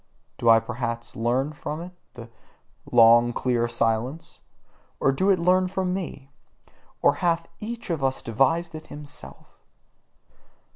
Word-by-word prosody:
Did 115 - +2
I 115 0 +8
perhaps 115 0 -5
learn 125 +6 0
from 150 +1 -5
it 175 +2 -8 0.2
the 120 -2 -9 0.6
long 120 0 +6
clear 120 -2 0
silence? 115 +5 -2 0.6
Or 135 - +3
did 190 +9 +1
it 195 - +5
learn 180 +2 +3
it - - -4
from 185 -1 -1
me? 145 -7 -6 0.7
Or - - +5
hath 170 -1 +1
each 230 -3 -6
of 160 -5 -2
us 135 0 0
devised 135 +9 +1
it 155 0 -9
himself? 145 -1 -10
135 Hz, 140 wpm, -25 LUFS, 120-170 Hz, 0.7 s, I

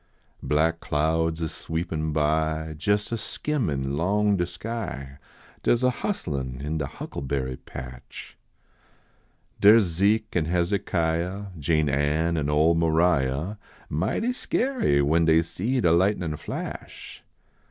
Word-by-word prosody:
Black 80 +2 +1
clouds 80 +2 0
a 80 - 0
sweepin 80 -1 -3
by, 80 +1 0
Jes 105 +4 +1
a 115 - -1
skimmin 80 - -2
long 100 +5 +2
de 90 -2 0
sky, 90 -8 -6 0.4
Dar - - +3
s 120 - -3
a 125 - +4
hustlin 70 - -3
in 75 +3 -3
de 70 - -2
huckleberry 65 -2 -4
patch. 65 0 -10 1.2
Dar 105 +2 +8
s 115 - +5
Zeke 100 +5 +1
and 80 -3 +1
Hezekiah, 90 +1 -1
Jane 75 +1 +2
Ann 75 +4 +1
an 75 -3 -1
ole 75 +3 +4
Maria, 80 +1 +1 0.3
Mighty 220 - 0
skeery 250 - +1
when 80 +4 +3
dey 80 0 +5
see 115 +10 -1
de 85 -7 +3
lightnin 90 -2 +2
flash. - - -7
80 Hz, 125 wpm, -25 LUFS, 75-100 Hz, 1.2 s, Dar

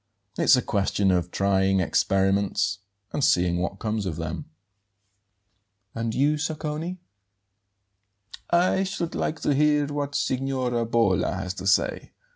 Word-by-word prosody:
It's - - +5
a 125 - 0
question 100 -1 +1
of 90 -1 0
trying 95 0 +2
experiments 95 +3 +1 0.3
and 145 - -1
seeing 90 -4 +3
what 90 +2 -3
comes 110 -2 -2
of 85 - -3
them." 80 - -5 1.5
"And 115 -1 -3
you, 145 +3 +2
Sacconi?" 155 +3 -3 1.5
"I 180 +2 +3
should 185 -3 -3
like 160 - -2
to 145 - +1
hear 150 +1 +3
what 145 0 -4
Signora 130 -3 -1
Bolla 110 -6 +2
has 95 -1 -4
to 95 0 -6
say. 95 - +1
115 Hz, 125 wpm, -25 LUFS, 95-145 Hz, 1.5 s, It's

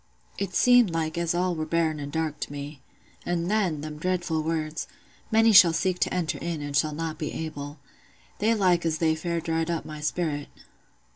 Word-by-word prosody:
It 195 -2 -3
seemed 245 -4 +6
like 160 -1 -2
as 170 0 0
all 180 0 +1
were 155 -2 -3
barren 160 -2 0
an' 140 -1 -5
dark 160 -1 -2
to - - -4
me. 145 -1 -7 0.4
And 175 +1 -1
then, 185 -9 +1
them 150 0 -7
dreadful 175 -2 -1
words, 160 0 -2 0.4
'Many 225 +1 +5
shall 180 -5 +8
seek 180 +1 0
to - - +1
enter 175 -4 -1
in, 170 -2 -3
and 145 -1 -4
shall 150 +1 +1
not 160 0 -4
be 150 -3 -3
able.' 145 -2 -6 0.6
They 225 +2 +3
like 180 -4 +3
as 160 -1 0
they 160 0 +2
fair 170 +1 -2
dried 165 0 -1
up 170 -1 -2
my 155 -1 -7
sperrit. 150 -1 -2
165 Hz, 195 wpm, -26 LUFS, 155-175 Hz, 0.6 s, shall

